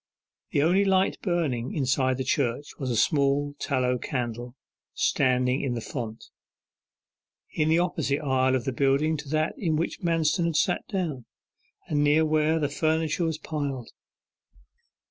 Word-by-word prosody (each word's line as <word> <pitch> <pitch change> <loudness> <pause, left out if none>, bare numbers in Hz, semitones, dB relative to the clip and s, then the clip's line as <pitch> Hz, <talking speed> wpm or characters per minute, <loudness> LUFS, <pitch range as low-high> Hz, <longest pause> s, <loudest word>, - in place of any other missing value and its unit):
The 140 - +1
only 180 +5 +4
light 190 -1 +2
burning 150 - -1
inside 130 -2 +1
the 130 - -2
church 130 +1 -1
was 130 - -3
a 120 - 0
small 140 +3 +2
tallow 125 -3 0
candle, 120 -1 -4 0.4
standing 125 0 +2
in 130 -3 -2
the - - -2
font, 115 -1 -6 1.3
in 155 0 0
the 160 - +4
opposite 160 -5 0
aisle 130 -2 +2
of 130 - -2
the 135 - -1
building 140 +4 +2
to 145 -1 -8
that 155 +1 0
in 165 -5 0
which 165 +2 -2
Manston 165 0 +1
had 165 -2 -1
sat 180 +3 +1
down, 165 - -3 0.6
and 145 -3 +1
near 150 +2 +4
where 155 +1 +2
the 150 -2 0
furniture 160 +3 0
was 160 -1 -1
piled. 140 -6 -4
145 Hz, 150 wpm, -26 LUFS, 130-160 Hz, 1.3 s, only